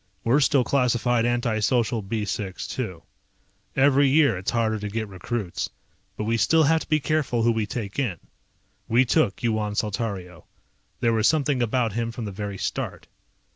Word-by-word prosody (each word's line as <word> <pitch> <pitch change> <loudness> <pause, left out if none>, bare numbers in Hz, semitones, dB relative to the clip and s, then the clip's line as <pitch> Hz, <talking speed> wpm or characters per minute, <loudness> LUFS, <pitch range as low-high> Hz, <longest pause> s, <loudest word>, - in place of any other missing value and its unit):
We're 125 +5 +3
still 140 -2 +3
classified 120 -2 +2
anti 120 -2 0
social 115 +1 +1
B 105 +2 -3
6, 95 -1 -4
too. 90 -10 -4 0.7
Every 140 0 +4
year 140 -5 +4
it's 95 +4 -3
harder 110 -2 0
to 105 0 -4
get 110 +1 -3
recruits, 100 0 -4 0.5
but - - -2
we 115 +2 0
still 160 +7 +4
have 160 +2 +4
to - - -9
be 155 - +3
careful 140 -6 0
who 120 - +4
we 110 -2 -1
take 110 -1 -4
in. 115 -11 -1 0.7
We 120 +3 +4
took 125 -5 +1
Yuan 110 -3 0
Saltario. 100 -5 -3 0.6
There 115 -1 +3
was 110 -1 +3
something 145 -4 +2
about 120 -2 +1
him 115 +1 -2
from 115 -1 -6
the 100 - -4
very 100 0 -5
start. - - -4
115 Hz, 175 wpm, -24 LUFS, 105-130 Hz, 0.7 s, Every